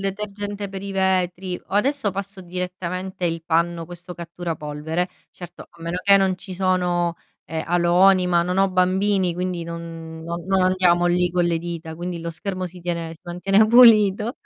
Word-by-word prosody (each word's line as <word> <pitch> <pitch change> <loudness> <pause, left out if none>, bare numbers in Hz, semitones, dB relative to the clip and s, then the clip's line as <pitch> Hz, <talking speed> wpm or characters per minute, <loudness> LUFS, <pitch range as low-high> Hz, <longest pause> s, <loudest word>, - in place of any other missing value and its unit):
detergente 200 0 -4
per 195 - -6
i 200 - -5
vetri. 185 -1 0
O - - -7
adesso 260 +1 +1
passo 195 0 -6
direttamente 180 0 -4
il 165 -1 -3
panno, 170 0 0
questo 175 +1 -10
cattura 170 -1 -5
polvere. 155 +4 -3 0.2
Certo, 175 -1 -11
a 170 -1 -17
meno 170 +2 -3
che 200 0 +6
non 190 -2 +1
ci 185 0 -8
sono, 180 -2 +1 0.3
ehm, 160 -1 -4
aloni, 180 +2 +4
ma 175 -1 +3
non 180 +2 -1
ho 195 0 +3
bambini, 185 0 +1
quindi 180 -1 -3
non 165 -1 -8
no 170 +1 -3
non 190 -1 +2
andiamo 180 -1 +3
lì 180 0 +2
con 175 0 +1
le 170 -1 +1
dita, 165 -1 -6
quindi 175 +1 -5
lo 170 0 -5
schermo 185 +2 -4
si 180 0 -8
tiene 170 -1 -3
si 165 - -15
mantiene 195 +5 +2
pulito. 220 -2 +6
180 Hz, 180 wpm, -22 LUFS, 170-190 Hz, 0.3 s, che